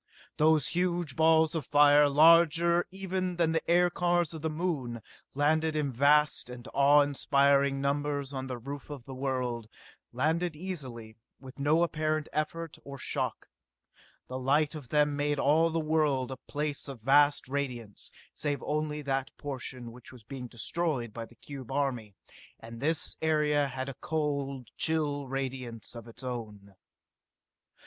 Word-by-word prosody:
Those 155 -2 +3
huge 175 -5 -1
balls 160 0 +4
of 160 -3 -2
fire, 145 +1 +5
larger 170 +3 +5
even 185 -1 -3
than 170 -2 +2
the 160 - +1
aircars 175 -1 +2
of 160 - -7
the 160 - -1
Moon, 150 -8 -3 0.3
landed 155 +2 +2
in 150 -3 0
vast 145 +1 +3
and 125 0 -9
awe 145 +1 +6
inspiring 140 -1 +2
numbers 145 0 -1
on 130 -1 -4
the 125 -1 -4
roof 140 +5 -8
of 145 -4 -7
the 135 - -8
world 130 -4 -2 0.4
landed 160 +6 0
easily, 130 -11 -6 0.2
with 130 0 -12
no 155 +4 +3
apparent 155 -2 -1
effort 160 +2 -3
or 140 0 -8
shock. - - -3 0.8
The 130 +1 -5
light 145 +4 +2
of 145 -6 -9
them 150 -1 +2
made 145 0 0
all 155 +4 +3
the 165 0 -1
world 150 -5 +1
a 130 - -5
place 145 -1 -3
of 135 -4 -8
vast 145 +4 +4
radiance, 125 -6 -4 0.2
save 145 -3 -2
only 150 0 -2
that 135 -1 -1
portion 130 -4 -6
which 125 +1 -12
was 125 -4 -14
being 125 +2 -7
destroyed 125 -1 -1
by 115 -1 -6
the 120 - -19
cube 135 0 -9
army, 125 -7 -2 0.4
and 115 +1 -10
this 155 +4 0
area 150 -2 +2
had 130 0 -5
a 135 - -5
cold, 140 -3 -3
chill 145 -3 +1
radiance 130 -4 -5
of 115 -1 -9
its 115 +3 -12
own. 105 -5 -6
145 Hz, 150 wpm, -29 LUFS, 130-155 Hz, 0.8 s, awe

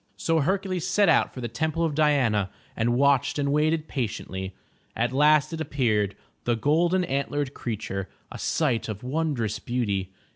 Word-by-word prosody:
So 165 -1 +1
Hercules 185 +2 0
set 205 -3 +3
out 160 - +4
for 130 - -8
the 120 - -2
Temple 160 +7 -1
of 160 - -1
Diana, 135 -10 +2 0.3
and 120 +1 +1
watched 140 +1 +3
and 140 -1 0
waited 155 +2 +1
patiently. 95 -6 -4 0.4
At 120 +2 0
last 150 +2 +4
it 160 - -3
appeared, 115 -9 0
— - - -42
^the 120 -1 +1
golden 170 +7 +2
antlered 140 -2 -2
creature, 100 -4 -4 0.2
a - - -7
sight 120 -8 0
of 105 0 -5
wondrous 130 -6 -1
beauty. 100 -6 -2
140 Hz, 160 wpm, -26 LUFS, 115-155 Hz, 0.4 s, out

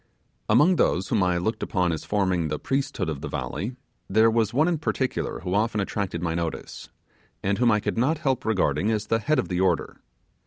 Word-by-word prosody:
Among 175 +4 +5
those 95 -7 +1
whom 110 - +2
I 90 -1 +2
looked 100 +6 -2
upon 90 -3 0
as 80 - -4
forming 95 -5 +1
the 75 0 -2
priesthood 135 - -2
of 75 -3 -4
the 75 - -4
valley, 110 - -4 0.3
there 110 +3 +4
was 110 -2 +1
one 150 +7 +3
in 170 -3 0
particular 130 - -2
who 90 0 -3
often 105 +1 +1
attracted 100 -3 -2
my 85 -2 0
notice, 85 -1 -5 0.5
and 100 +2 0
whom 120 -1 +4
I 105 - +3
could 110 - -2
not 150 +7 +2
help 135 -5 -1
regarding 95 -4 +1
as 110 -1 0
the 115 - +1
head 145 +8 +1
of 130 - 0
the 90 -1 -2
order. 90 -3 0
105 Hz, 205 wpm, -25 LUFS, 90-120 Hz, 0.5 s, Among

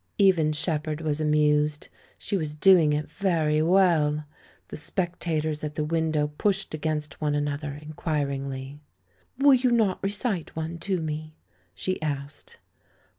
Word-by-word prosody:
Even 180 -6 +4
Shepherd 155 -1 -2
was 155 -1 -1
amused; 150 -1 +2 0.3
she - - -3
was 155 -5 -2
doing 170 -2 +6
it 150 0 -1
very 160 -6 +1
well. 160 -4 +3 0.5
The - - -6
sj^ectators 160 -3 -2
at 150 -1 -4
the 155 - -1
window 155 -1 0
pushed 195 -4 0
against 155 0 -3
one 150 -1 +1
another 145 0 -2
inquiringly. 140 -3 -3 0.6
"Will 280 +1 +6
you 255 0 +3
not 220 -5 +2
recite 200 -2 -2
one 160 +1 -4
to 185 +2 -1
me?" 155 0 -5 0.4
she 185 -3 -3
asked. 145 -1 -5
155 Hz, 130 wpm, -26 LUFS, 150-175 Hz, 0.6 s, doing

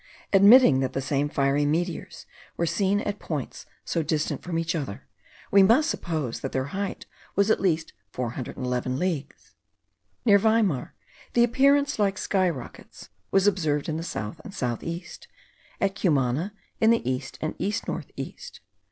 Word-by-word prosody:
Admitting 200 - +7
that 130 -1 -1
the - - -1
same 140 +1 0
fiery 140 0 +1
meteors 165 +3 -2 0.3
were 170 - +1
seen 195 +4 +1
at 205 0 -3
points 150 -6 -5 0.2
so 170 - 0
distant 155 0 -1
from 175 -2 -3
each 165 0 -1
other, 140 - -5 0.5
we 200 - +7
must 260 +12 +5
suppose 155 -9 -3
that 135 - -4
their 130 +1 -1
height 200 0 -3 0.3
was 200 +2 +3
at - - +3
least 165 -4 0 0.2
411 125 +2 -3
leagues. 155 -4 -4 0.7
Near 200 -3 +6
Weimar, 220 - +1 0.4
the 235 - +5
appearance 280 +3 +3
like 195 -2 +1
sky 185 -2 +1
rockets 130 -8 -9 0.2
was 195 0 +3
observed 155 -8 +1
in 155 -1 -2
the - - -3
south 105 - -5
and 210 -3 -10
south 120 -6 -2
east; 170 +2 -7 0.5
at 195 -1 +1
Cumana, 155 -1 0 0.3
in 220 - +4
the 230 - +2
east 130 0 -3
and 155 - -2
east 210 +3 -2
north - - -4
east. - - -8
170 Hz, 160 wpm, -26 LUFS, 140-200 Hz, 0.7 s, Admitting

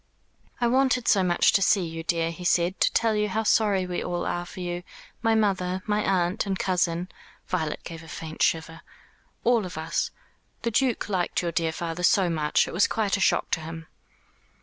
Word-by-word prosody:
"I 240 - +1
wanted 250 0 +2
so 200 - +5
much 175 -2 +3
to 195 - +2
see 195 -1 +3
you, 165 0 -5
dear," 165 0 0
he 175 +2 -9
said, 175 +1 +1
"to - - +4
tell 225 -1 +2
you 210 0 0
how 220 +3 -1
sorry 205 -3 +2
we 180 -1 -3
all 175 -1 -2
are 175 0 -2
for - - -10
you 175 -1 -3 0.4
my 225 -1 +3
mother, 190 -3 0
my 210 0 +1
aunt, 185 +2 0
and 190 -1 -1
cousin" 180 -2 0 0.4
Violet 160 -5 -2
gave 165 -1 -8
a 165 - -13
faint 160 0 -7
shiver 165 0 0 0.6
"all 235 -2 +3
of 180 -4 -7
us. 160 +1 -1 0.5
The 235 - 0
Duke 250 +1 +1
liked 185 -3 -1
your 170 - -1
dear 165 -1 0
father 165 +1 -4
so 180 0 +3
much. 150 -2 +1
It - - -7
was 185 +4 +3
quite 210 -3 0
a - - -3
shock - - +2
to - - +1
him." 160 +1 -8
180 Hz, 200 wpm, -26 LUFS, 165-210 Hz, 0.6 s, so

